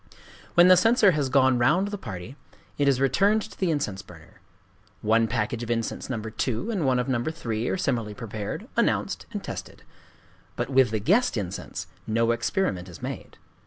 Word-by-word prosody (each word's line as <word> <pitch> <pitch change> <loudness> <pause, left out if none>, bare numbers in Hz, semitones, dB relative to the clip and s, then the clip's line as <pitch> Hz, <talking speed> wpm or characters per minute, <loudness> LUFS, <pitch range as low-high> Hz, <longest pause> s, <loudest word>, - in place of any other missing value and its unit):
When 175 +1 +7
the 185 - +8
censer 220 +2 +5
has 145 -5 0
gone 130 -1 +4
the 125 - 0
round 155 +11 +3
of - - -6
the 205 - -3
party, 95 - -7 0.4
it 145 - +3
is 135 -2 +3
returned 195 - +3
to 200 - -11
the 185 - +1
incense 105 -11 -1
burner. 85 -5 -16 0.6
One 115 +1 +3
package 115 0 -2
of 120 - -5
incense 115 +2 -2
No. 125 -4 -2
2, 110 - -3
and 180 -10 0
one 130 -1 +3
of 125 +1 -1
No. 125 -3 0
3, 120 -8 -3
are - - 0
similarly 115 - -1
prepared, 110 -3 -5
announced, - - 0
and - - -5
tested. - - -7 0.7
But - - -3
with 130 -2 +5
the 110 - -1
"guest 200 - +2
incense" 95 -2 -5 0.2
no 115 +1 +2
experiment 115 - -1
is 85 - -12
made. - - -6
125 Hz, 190 wpm, -26 LUFS, 110-165 Hz, 0.7 s, the